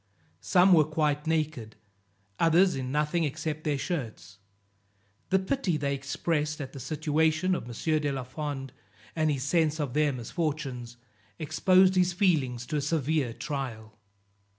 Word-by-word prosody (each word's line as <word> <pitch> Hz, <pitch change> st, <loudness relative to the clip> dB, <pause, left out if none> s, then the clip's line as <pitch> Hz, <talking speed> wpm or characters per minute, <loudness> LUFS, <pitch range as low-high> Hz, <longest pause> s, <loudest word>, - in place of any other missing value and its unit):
Some 180 Hz, -, +4 dB
were 160 Hz, -3 st, +7 dB
quite 150 Hz, 0 st, -1 dB
naked, 155 Hz, -9 st, -1 dB, 0.6 s
others 175 Hz, +3 st, +4 dB
in 130 Hz, -1 st, -4 dB
nothing 150 Hz, +3 st, +1 dB
except 155 Hz, +1 st, -3 dB
their 150 Hz, -2 st, +1 dB
shirts; 110 Hz, -, -5 dB, 0.9 s
the 190 Hz, -, +4 dB
pity 190 Hz, -, -1 dB
they 140 Hz, -1 st, -1 dB
expressed 150 Hz, +3 st, -2 dB
at 140 Hz, -3 st, -6 dB
the 135 Hz, -, -8 dB
situation 155 Hz, +5 st, +1 dB
of 175 Hz, -, -3 dB
M. 155 Hz, +7 st, -1 dB
de 145 Hz, -1 st, -1 dB
la 135 Hz, -2 st, -3 dB
Fond, 135 Hz, 0 st, -5 dB, 0.4 s
and 155 Hz, -1 st, +1 dB
his 135 Hz, -3 st, -1 dB
sense 155 Hz, +1 st, +1 dB
of 140 Hz, -5 st, -2 dB
their 150 Hz, 0 st, +2 dB
misfortunes, 130 Hz, -2 st, -4 dB, 0.4 s
exposed 185 Hz, +5 st, +4 dB
his 180 Hz, -1 st, +2 dB
feelings 140 Hz, -, +1 dB
to 150 Hz, +3 st, -2 dB
a -, -, 0 dB
severe 150 Hz, -3 st, 0 dB
trial. 115 Hz, -4 st, -6 dB
150 Hz, 145 wpm, -28 LUFS, 135-160 Hz, 0.9 s, were